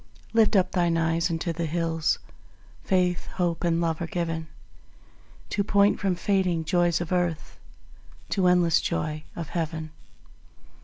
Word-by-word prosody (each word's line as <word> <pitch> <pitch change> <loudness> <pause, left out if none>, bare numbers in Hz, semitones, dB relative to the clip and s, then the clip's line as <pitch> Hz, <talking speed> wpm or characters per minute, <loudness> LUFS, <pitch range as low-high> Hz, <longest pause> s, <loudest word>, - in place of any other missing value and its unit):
Lift 225 -1 +4
up 185 -1 +3
thine 175 -2 +1
eyes 165 +1 +1
unto 165 0 -2
the 165 0 -2
hills; 165 -1 0 0.7
Faith, 180 -2 +1
Hope 175 -2 -1
and 170 -1 +2
Love 165 -1 -1
are 170 - -2
given 165 -2 -3 1.0
To 200 - +1
point 200 0 +3
from 195 -3 0
fading 180 -3 0
joys 175 0 +2
of 175 - -5
earth, 175 -3 -1 0.7
To 190 -3 +2
endless 175 -3 +4
joy 150 - -2
of 165 -2 -5
Heaven. 160 -2 -3
170 Hz, 140 wpm, -26 LUFS, 165-180 Hz, 1.0 s, Lift